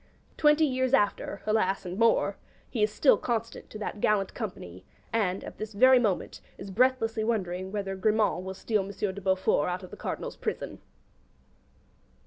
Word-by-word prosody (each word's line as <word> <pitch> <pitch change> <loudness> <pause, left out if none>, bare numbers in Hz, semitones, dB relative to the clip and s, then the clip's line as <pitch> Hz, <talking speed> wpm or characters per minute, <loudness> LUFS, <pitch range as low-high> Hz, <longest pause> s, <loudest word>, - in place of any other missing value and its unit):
'Twenty 300 +1 +4
years 260 -1 +2
after' 205 -3 -1
(alas 200 -3 +1
and 180 +3 -5
more) 230 -3 +3 0.3
he 225 - -3
is 210 0 +3
still 265 +6 +4
constant 230 -1 -3
to - - -8
that 210 -1 -5
gallant 200 -2 +1
company; 95 - -7 0.3
and, 195 -4 0
at - - -10
this 215 0 -5
very 255 +5 +6
moment, 210 -6 -1 0.2
is 195 0 -8
breathlessly 225 0 +2
wondering 190 -4 -2
whether 195 -2 -3
Grimand 210 -2 +1
will 190 0 -6
steal 215 +1 0
M. 195 - -8
de 200 0 -3
Beaufort 190 -4 +1
out 180 +2 -3
of 185 - -10
the - - -9
Cardinal's - - -5
prison. - - -4
210 Hz, 165 wpm, -28 LUFS, 190-230 Hz, 0.3 s, very